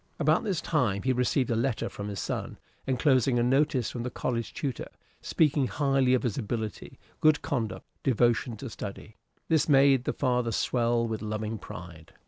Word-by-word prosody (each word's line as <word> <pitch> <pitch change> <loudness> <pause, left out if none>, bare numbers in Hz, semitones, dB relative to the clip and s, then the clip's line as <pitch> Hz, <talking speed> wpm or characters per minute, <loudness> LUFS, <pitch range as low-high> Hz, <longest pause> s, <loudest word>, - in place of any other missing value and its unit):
About 155 +1 +2
this 190 -6 -1
time 115 -14 0
he 130 - +2
received 125 0 +1
a - - +2
letter 115 -1 0
from 100 - -6
his 100 -1 -4
son, - - -4 0.3
enclosing 130 -1 +3
a 120 - +3
notice 135 -1 +2
from 120 - -5
the 125 - -3
college 115 -2 -3
tutor, 135 -5 -4 0.3
speaking 145 -4 +2
highly 135 -3 +2
of 125 - -1
his 120 -1 -1
ability, 110 -2 -4 0.2
good 155 -1 +4
conduct, 120 -6 -3 0.2
devotion 120 -2 +1
to 130 +3 -7
study. 105 +2 -8 0.3
This 160 -1 +2
made 135 -2 +5
the - - 0
father 125 -3 0
swell 115 +1 +1
with 110 -1 -4
loving 110 0 -3
pride. 80 -3 -10
125 Hz, 170 wpm, -28 LUFS, 110-135 Hz, 0.3 s, made